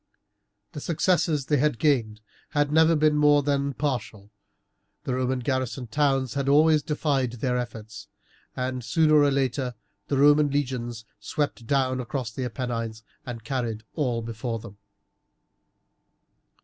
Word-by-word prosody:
The 145 - -7
successes 165 -3 +1
they 150 - +2
had 150 -2 +1
gained 115 -8 +1 0.4
had 145 0 +2
never 160 +1 +5
been 155 0 +3
more 145 -1 +4
than 140 -1 0
partial, 120 -8 -3 0.7
the 130 - -2
Roman 130 0 -1
garrison 130 0 -2
towns 135 0 +1
had 140 -1 -1
always 155 +2 +5
defied 140 -4 -1
all - - -13
their 125 +1 0
efforts, 110 -3 -6 0.5
and 125 0 -3
sooner 155 +4 +2
or 145 - +4
later 130 -2 -1 0.3
the 140 - 0
Roman 145 +1 +5
legions 125 -5 -3
swept 145 -6 -3
down 130 -1 +1
across 125 -2 -4
the 130 +3 -4
Apennines 115 -3 -4 0.2
and 120 -2 -6
carried 115 -3 -3
all 125 -7 -1
before 115 +1 -4
them. 105 -2 -12
130 Hz, 135 wpm, -26 LUFS, 120-145 Hz, 0.7 s, never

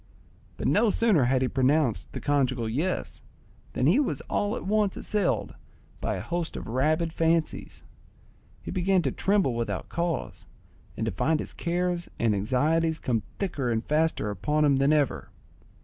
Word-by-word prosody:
But - - -4
no 235 - +3
sooner 205 - +3
had 130 +1 +2
he - - +2
pronounced 130 - +1
the - - -4
conjugal 130 -5 0
"yes," 155 +12 -2 0.5
than 125 - 0
he 175 - +5
was 160 - 0
all 205 +3 -1
at - - -6
once 210 0 +1
assailed 205 -4 -1 0.5
by - - -2
a - - -4
host 170 -1 -3
of - - -6
rabid 155 +7 0
fancies; 165 -1 -1 0.8
he - - -5
began 185 0 +2
to - - 0
tremble 195 -10 +1
without 115 0 -3
cause 165 - -3 0.5
and 110 - -1
to 110 - -1
find 155 - +1
his - - -6
cares 175 0 -1
and 115 -2 +2
anxieties 155 +10 +1
come 115 -7 -1 0.2
thicker 150 -10 -2
and 115 -1 -1
faster 155 -8 +1
upon 150 +10 +1
him 140 -2 +4
than 135 +2 +3
ever. 150 -3 +1
155 Hz, 165 wpm, -27 LUFS, 125-175 Hz, 0.8 s, he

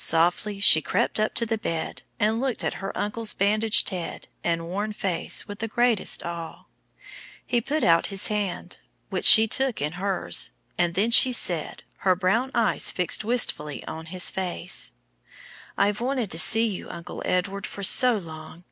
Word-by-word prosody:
Softly 175 +5 +1
she 160 -6 +6
crept - - -1
up 215 - -1
to 230 0 +4
the 225 -1 -2
bed 165 -6 -4 0.2
and 220 +3 +1
looked 265 -3 -2
at - - -1
her 195 - -4
uncle's 210 +1 -1
bandaged 215 +2 +2
head 180 -3 -6 0.2
and 165 -1 -1
worn 205 +4 -3
face 185 -4 -1
with 205 0 -9
the 225 - -3
greatest 240 -2 +1
awe. 170 -1 -7 0.8
He 240 - 0
put 300 +6 -2
out 170 0 +3
his 195 -1 -1
hand, 205 -4 -3 0.3
which - - -2
she 220 -1 +9
took 260 +2 -1
in 150 +1 -2
hers, 175 - 0 0.3
and 175 -1 0
then 210 +5 +1
she 255 +2 +6
said, 175 -9 0
her 185 -1 +1
brown 200 +8 0
eyes 230 -2 +2
fixed 180 +3 0
wistfully 210 - 0
on 160 0 -8
his 180 +1 0
face, 180 -1 -3 0.8
"I've 205 +2 0
wanted 250 -4 -2
to 165 - 0
see 225 +6 +4
you, 205 -5 -5
Uncle 170 0 -8
Edward, 195 +2 -2
for 200 - -9
so 245 +4 +6
long. 160 -3 -10
200 Hz, 170 wpm, -24 LUFS, 175-225 Hz, 0.8 s, she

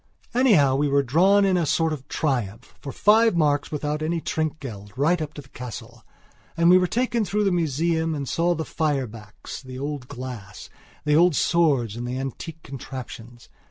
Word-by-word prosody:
Anyhow, 200 - +4
we 145 +1 +1
were 140 0 +2
drawn 190 +10 +4
in 190 -2 +2
a 170 -3 0
sort 160 +1 +1
of 135 -3 -8
triumph, 120 -6 -2
for 140 - -6
five 220 +3 +4
marks 145 -2 +1
without 150 0 -2
any 165 +2 -1
trinkgeld, 135 -12 -4
right 160 +5 +2
up 155 -1 -5
to 145 - -8
the 135 - -21
castle. 125 -6 -9 0.5
And 170 +1 +5
we 180 - +8
were 180 - +1
taken 235 +3 0
through 210 +1 0
the 195 - +2
museum 165 0 0
and 140 -2 -4
saw 170 +4 +1
the 160 0 -3
fire 145 -4 -1
backs, 105 -2 -10
the 130 -1 -9
old 140 -2 -5
glass, 120 -8 -8 0.3
the 150 0 +3
old 170 0 +5
swords 140 -12 +2
and 120 +1 -5
the 125 +1 -3
antique 150 +5 -6
contraptions. 120 -3 -9
150 Hz, 185 wpm, -24 LUFS, 130-170 Hz, 0.5 s, we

